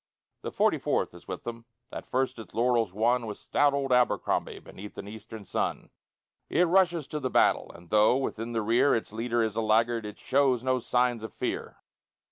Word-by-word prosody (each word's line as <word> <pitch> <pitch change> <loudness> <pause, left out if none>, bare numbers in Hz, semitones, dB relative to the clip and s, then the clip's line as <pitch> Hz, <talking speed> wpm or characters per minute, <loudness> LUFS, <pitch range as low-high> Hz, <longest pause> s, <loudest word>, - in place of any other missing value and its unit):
The - - -5
Forty - - +2
fourth - - -1
is - - -15
with - - -6
them, 115 0 -7 0.3
That - - -7
first 130 -2 -1
its 110 -5 -11
laurels 115 -4 +2
won 115 +4 +1
With 105 - -5
stout 145 -1 +2
old 135 -2 0
Abercrombie 125 0 +1
Beneath 105 +2 -11
an - - -7
eastern 110 0 -9
sun. - - -3 0.6
It 175 - +3
rushes 175 -3 +3
to 150 - -4
the 130 -3 -2
battle, - - +2
And, 85 +1 -15
though 105 +4 +5
within 120 -3 -3
the 115 -2 -1
rear 120 +6 +3
Its 110 -2 -4
leader 115 +1 0
is 110 -1 -2
a 115 - 0
laggard, 115 +1 +2
It 105 - -9
shows 130 -3 +2
no 130 0 +1
signs 125 -1 +1
of 110 -2 -7
fear. - - -5
120 Hz, 195 wpm, -28 LUFS, 110-130 Hz, 0.6 s, though